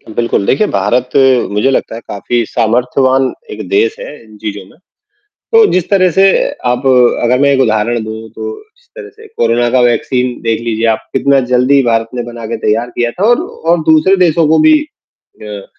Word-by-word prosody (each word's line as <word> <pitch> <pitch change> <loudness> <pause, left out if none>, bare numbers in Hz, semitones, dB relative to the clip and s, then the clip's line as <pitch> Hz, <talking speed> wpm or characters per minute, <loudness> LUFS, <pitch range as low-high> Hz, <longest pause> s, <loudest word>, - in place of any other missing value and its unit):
बिल्कुल, 115 -4 -1
देखिए 215 - +1
भारत 120 +6 -1 0.4
मुझे 105 +6 +1
लगता 130 - -2
है 115 - -8
काफ़ी 120 +4 -2
सामर्थ्यवान 125 +4 0 0.2
एक - - -7
देश 420 +2 +1
है - - -7 0.2
इन 110 -1 -17
चीज़ों 105 -2 -6
में, - - -22 0.7
तो 455 -1 +6
जिस 185 -2 -1
तरह 185 -2 +3
से 190 +4 +2 0.4
आप 125 +2 -1 0.4
अगर 125 +2 +2
मैं 140 0 +3
एक 135 - 0
उदाहरण 110 0 0
दूँ 110 0 -8
तो - - -6 0.3
जिस 485 0 -30
तरह 455 -3 -10
से 440 +1 -16
कोरोना 120 +1 +1
का 130 - +2
वैक्सीन 125 +1 0
देख 115 0 -1
लीजिए 115 -1 -2
आप, 110 -1 -1
कितना 140 +1 +2
जल्दी 130 +3 +3
भारत 115 -2 0
ने 120 - -3
बना 120 -1 -9
के 110 - -4
तैयार 115 +3 -1
किया 120 -1 0
था 185 - -5
और 240 +6 +3
और 405 - -1
दूसरे 160 +5 +4
देशों 165 -1 +1
को 160 - +3
भी 315 0 +5
अ, 105 - -13
125 Hz, 190 wpm, -12 LUFS, 115-170 Hz, 0.7 s, तो